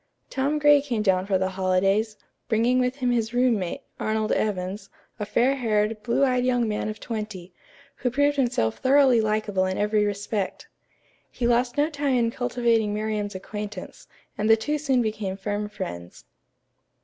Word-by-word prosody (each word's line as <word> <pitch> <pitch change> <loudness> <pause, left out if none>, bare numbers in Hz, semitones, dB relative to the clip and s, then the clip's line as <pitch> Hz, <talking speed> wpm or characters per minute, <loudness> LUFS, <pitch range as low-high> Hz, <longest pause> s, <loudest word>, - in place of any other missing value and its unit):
Tom 275 +3 0
Gray 295 -1 +5
came 240 -7 -2
down 190 -2 +2
for 195 -2 +2
the 190 0 0
holidays, 195 +3 +1 0.3
bringing 240 +3 +2
with 250 0 0
him 250 -3 0
his 235 0 -1
roommate, 230 -8 +1 0.2
Arnold 215 0 -1
Evans, 195 -1 -2 0.3
a 210 - -3
fair 260 +6 +2
haired, 215 -3 0
blue 235 +5 +2
eyed 250 -1 +1
young 245 -2 +1
man 210 0 -2
of 215 - -6
twenty, 210 -6 -6 0.4
who 250 - -1
proved 285 +4 +2
himself 245 - 0
thoroughly 265 -3 +5
likable 210 -3 0
in 185 - -2
every 210 0 +2
respect. 205 0 -3 0.6
He 240 - -4
lost 245 +2 +1
no 295 +1 +3
time 285 -3 0
in 230 -2 +2
cultivating 235 -4 0
Miriam's 210 -1 -2
acquaintance, 210 0 -7 0.3
and 215 +1 +1
the 225 - +7
two 295 +7 -2
soon 265 -4 +1
became 215 -3 -3
firm 205 +1 -3
friends. 85 - -7
220 Hz, 160 wpm, -25 LUFS, 205-250 Hz, 0.6 s, the